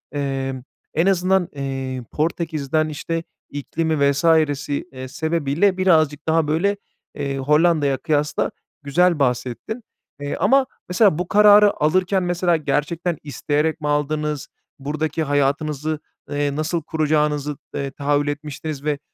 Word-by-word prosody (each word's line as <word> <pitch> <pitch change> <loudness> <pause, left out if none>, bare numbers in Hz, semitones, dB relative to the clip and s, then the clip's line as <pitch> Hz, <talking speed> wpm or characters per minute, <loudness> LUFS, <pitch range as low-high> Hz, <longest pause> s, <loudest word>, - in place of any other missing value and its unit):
Eee, 135 -2 -2 0.3
en 165 - +2
azından, 190 -1 +2
eee, 135 -2 -4
Portekiz'den 155 -1 -1
işte, 165 +2 -3 0.3
iklimi 145 0 0
vs. 140 +2 -2 0.5
eee, 135 -3 -4
sebebiyle 160 +5 0
birazcık 155 -6 +2
daha, 160 -1 +2
böyle, 185 +7 +1 0.4
eee, 140 -2 -3
Hollanda'ya 150 0 +3
kıyasla 150 +2 0 0.3
güzel 170 +4 +2
bahsettin. 125 - -2 0.4
Eee, 145 0 -3
ama 270 0 +3 0.2
mesela 180 -3 +4
bu 180 - -2
kararı 210 0 +7
alırken, 185 +5 +2
mesela, 175 -1 +1
gerçekten 160 +3 -1
isteyerek 150 +2 -1
mi 150 - -2
aldınız, 150 0 -1 0.3
buradaki 155 +3 -2
hayatınızı, 145 +1 0 0.3
eee, 145 -1 -1
nasıl 155 +3 -1
kuracağınızı, 150 -2 0 0.2
eee, 140 -1 -3
tahayyül 145 +1 0
etmiştiniz 145 0 -5
ve 150 -1 -1
150 Hz, 120 wpm, -21 LUFS, 140-165 Hz, 0.5 s, kararı